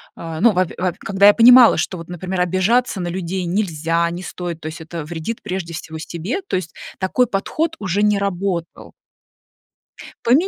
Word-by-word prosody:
а, 165 Hz, -1 st, -6 dB
ну, 235 Hz, +2 st, +6 dB
во 185 Hz, +1 st, +2 dB
пе -, -, -11 dB
во 180 Hz, -2 st, 0 dB
пе -, -, -23 dB
когда 195 Hz, +1 st, +3 dB
я 205 Hz, -, +8 dB
понимала, 245 Hz, +1 st, +8 dB
что 175 Hz, +3 st, -2 dB
вот, 165 Hz, -1 st, -9 dB
например, 180 Hz, +1 st, -3 dB
обижаться 190 Hz, +5 st, +1 dB
на 175 Hz, -, -3 dB
людей 185 Hz, +1 st, -3 dB
нельзя, 170 Hz, -3 st, 0 dB
не 175 Hz, +2 st, -6 dB
стоит, 170 Hz, -1 st, -6 dB
то -, -, -6 dB
есть 160 Hz, +1 st, -7 dB
это 160 Hz, 0 st, -6 dB
вредит, 165 Hz, +8 st, -6 dB
прежде 185 Hz, -4 st, -4 dB
всего, 160 Hz, -1 st, -7 dB
себе. 170 Hz, -, -4 dB
То 390 Hz, -, -4 dB
есть 180 Hz, -3 st, -4 dB, 0.2 s
такой 220 Hz, +7 st, +1 dB
подход 305 Hz, +11 st, -2 dB
уже 200 Hz, -, -1 dB
не 210 Hz, -1 st, +3 dB
работал. 190 Hz, -3 st, -3 dB, 1.3 s
Пони 275 Hz, +11 st, +4 dB
185 Hz, 190 wpm, -20 LUFS, 170-205 Hz, 1.3 s, я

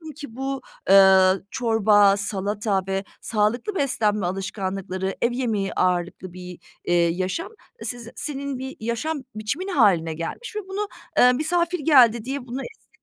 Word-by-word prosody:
ki 275 Hz, -6 st, -10 dB
bu, 270 Hz, 0 st, -3 dB, 0.3 s
eee, 190 Hz, -1 st, +7 dB, 0.2 s
çorba, 210 Hz, -4 st, +4 dB
salata 200 Hz, 0 st, -1 dB
ve 195 Hz, 0 st, -1 dB, 0.2 s
sağlıklı 230 Hz, -, 0 dB
beslenme 210 Hz, -, +1 dB
alışkanlıkları, 190 Hz, 0 st, -3 dB
ev 235 Hz, -, +2 dB
yemeği 225 Hz, -6 st, -1 dB
ağırlıklı 180 Hz, 0 st, -1 dB
bir, 180 Hz, -1 st, -9 dB, 0.3 s
eee, 175 Hz, -, +1 dB
yaşam 185 Hz, -, -2 dB, 0.3 s
siz 240 Hz, -2 st, -3 dB
senin 280 Hz, -2 st, -3 dB
bir 265 Hz, +1 st, -6 dB
yaşam 235 Hz, +7 st, -3 dB
biçimin 255 Hz, -, -3 dB
hâline 195 Hz, -, +3 dB
gelmiş 170 Hz, -, -6 dB
ve 425 Hz, -, -1 dB
bunu, 400 Hz, +2 st, -3 dB, 0.3 s
eee, 250 Hz, 0 st, +6 dB
misafir 340 Hz, +5 st, 0 dB
geldi 245 Hz, -7 st, +5 dB
diye 275 Hz, +2 st, -3 dB
bunu 255 Hz, +3 st, -4 dB
esnetmiyorsun. 450 Hz, -, -13 dB
220 Hz, 140 wpm, -23 LUFS, 190-270 Hz, 0.3 s, eee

